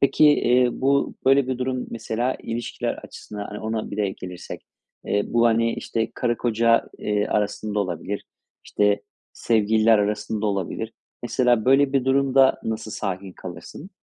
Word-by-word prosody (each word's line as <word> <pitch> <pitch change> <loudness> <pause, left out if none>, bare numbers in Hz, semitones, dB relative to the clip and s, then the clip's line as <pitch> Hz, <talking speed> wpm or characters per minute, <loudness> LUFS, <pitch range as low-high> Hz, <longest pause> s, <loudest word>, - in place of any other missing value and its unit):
Peki, 140 +2 +4
eee, 125 -3 +4
bu, 140 +1 +1
böyle 135 0 +5
bir 130 -1 -2
durum 130 0 -2
mesela 120 +2 -2
ilişkiler 115 0 -3
açısından, 105 -1 -9
hani, 105 - -7
ona 110 0 -3
bir - - -5
de 100 -2 0
gelirsek, 90 -2 -8 0.4
eee, 100 - +1
bu, 120 0 +3
hani, 115 0 +2
işte, 115 0 -2
karı 120 -2 0
koca, 115 0 +2
eee, 105 0 0
arasında 105 0 -1
olabilir, 95 +2 -4 0.4
işte, 105 0 +1 0.3
sevgililer 110 0 +3
arasında 105 +1 -1
olabilir. 100 +3 -3 0.3
Mesela, 120 -2 +2
böyle 135 +1 +4
bir 135 -2 +2
durumda 135 0 +3
nasıl 110 -1 -3
sakin 95 -2 -4
kalırsın? 95 - -10
115 Hz, 145 wpm, -23 LUFS, 105-125 Hz, 0.4 s, böyle